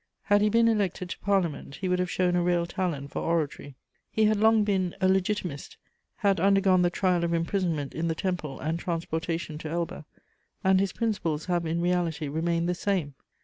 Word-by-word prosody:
Had 205 0 +3
he 210 - +4
been 230 +2 +4
elected 195 -5 0
to - - -6
Parliament, 180 -8 -1
he 190 - -4
would 180 0 +1
have 180 0 0
shown 180 -1 +1
a 175 - +2
real 175 -1 +1
talent 165 -6 -3
for - - -3
oratory. 155 -4 -2 0.3
He 220 - +2
had 215 0 +3
long 220 +1 +4
been 190 -4 0
a 190 - +3
Legitimist, 190 -5 -1 0.4
had 200 -4 +1
undergone 195 -1 +4
the 175 - +3
trial 180 -1 +1
of 170 0 +1
imprisonment 165 -4 -1
in 165 +1 -2
the 165 - -1
Temple 175 -6 -3
and 160 +4 -2
transportation 165 -2 -3
to 155 - -6
Elba, 170 -1 -3 0.6
and 190 0 +4
his 195 -1 +1
principles 180 -10 -2
have 175 -2 0
in 165 +1 -1
reality 170 -3 0
remained 165 +3 0
the 180 - +1
same. 175 -6 -1
175 Hz, 190 wpm, -27 LUFS, 165-195 Hz, 0.6 s, he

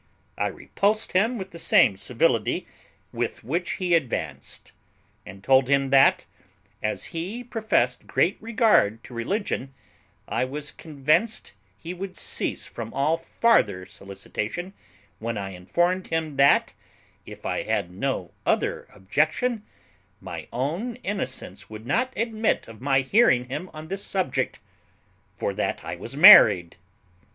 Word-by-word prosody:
I - - 0
repulsed 215 +2 -1
him 225 +7 +2
with 190 -2 -7
the 170 - -8
same 105 -9 +4
civility 115 +3 0 0.5
with - - -3
which 170 +9 -2
he 180 -2 -1
advanced; 85 - -2 0.6
and 95 -1 -11
told 130 +1 +4
him 135 -1 +2
that, 135 0 +5 0.6
as 105 - -3
he 190 +9 -4
professed 220 - 0
great 170 +9 +2
regard 215 - +2
to - - -12
religion, 135 - -3 0.5
I - - 0
was 145 +3 -4
convinced 155 - 0 0.2
he 170 +2 -7
would 185 +1 -7
cease - - -1
from 115 -1 -7
all 145 +4 +2
farther 165 - +1
solicitation 100 - -6 0.5
when 115 0 -3
I 100 -1 -4
informed 175 - -1
him 160 -3 -2
that, 140 0 +4 0.5
if - - -11
I - - -1
had 85 - -2
no 95 -1 -3
other - - 0
objection, 155 - 0 0.6
my - - -8
own 165 - -2
innocence 130 - -4
would 110 +1 -9
not 255 - 0
admit 225 -1 0
of 115 -1 -12
my 135 0 +2
hearing 130 - +3
him 180 +8 -5
on 155 +1 -9
this 195 +3 -5
subject, 185 -9 -1 0.8
for - - -2
that - - -2
I - - -4
was - - -7
married. 85 -1 +8
145 Hz, 135 wpm, -25 LUFS, 115-190 Hz, 0.8 s, married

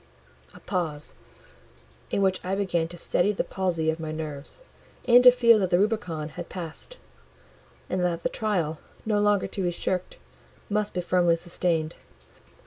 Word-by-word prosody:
A - - -12
pause—in 150 - -6
which 190 -1 +1
I 185 +2 -1
began 180 -5 0
to 175 +1 -11
steady 180 +4 +1
the - - -1
palsy 170 -4 -1
of 160 - -6
my 160 -1 -4
nerves, 155 - -6 0.5
and 245 0 +7
to 250 - +11
feel 235 -3 +5
that 190 -3 0
the 175 - +4
Rubicon 180 -7 -1
was - - -5
passed; 180 - -7 0.9
and 185 - -1
that 170 -1 -1
the - - +1
trial, 175 -8 -1 0.3
no 210 -1 +1
longer 205 -1 +3
to 195 - -5
be 180 - +1
shirked, 180 +1 -3 0.5
must 210 -1 0
be 180 - 0
firmly 175 -1 +3
sustained. 165 -1 -1
180 Hz, 155 wpm, -26 LUFS, 160-205 Hz, 0.9 s, to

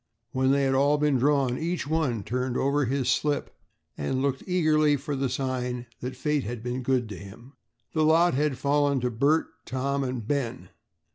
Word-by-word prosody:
When 130 0 +1
they 140 0 +3
had 135 0 +2
all 140 +2 +3
been 145 -3 +2
drawn, 135 -2 +2
each 170 +2 -2
one 140 -8 0
turned 125 +3 -2
over 140 +1 +1
his 130 +1 -1
slip 145 +4 0 0.4
and 75 - -2
looked 135 -1 0
eagerly 155 -5 +3
for 145 +1 -4
the 135 -1 -1
sign 125 -1 -2
that 125 +1 -5
fate 150 +2 0
had 115 +1 -5
been 125 +1 -3
good 125 -2 +1
to 105 - -6
him. 110 +7 -12 0.4
The 155 - +1
lot 165 +3 +4
had 145 0 0
fallen 145 -1 +2
to 125 0 0
Bert, 140 +8 +2 0.2
Tom, 140 +2 -1
and 125 -4 -4
Ben. 130 -3 -2
135 Hz, 185 wpm, -27 LUFS, 125-145 Hz, 0.4 s, lot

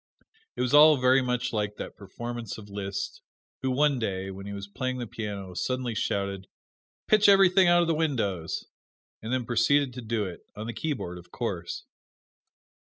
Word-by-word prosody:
It - - -3
was 125 +1 0
all 150 0 +8
very 130 +1 +5
much 125 -1 -1
like 105 -1 -1
that - - -7
performance 120 +2 -6
of 105 -2 -11
Liszt, 100 -1 -4 0.4
who 130 - 0
one 140 +1 +2
day, 95 -3 -2
when 100 +1 -8
he - - -5
was 100 0 -6
playing 130 +4 -3
the 125 - -3
piano, 100 -4 -6
suddenly 125 +5 -2
shouted, 100 -2 -2 0.6
"Pitch 215 -1 +6
everything 190 -1 +6
out 175 0 +5
of - - -1
the 165 - +2
windows!" 115 - -1 0.6
and 110 - -5
then 130 -2 0
proceeded 125 +3 +2
to 125 - -6
do 110 -2 -1
it 90 -2 -7 0.2
on 105 - -6
the 115 - -4
keyboard, 115 - -3
of 85 0 -16
course. - - -4
120 Hz, 175 wpm, -27 LUFS, 100-135 Hz, 0.6 s, all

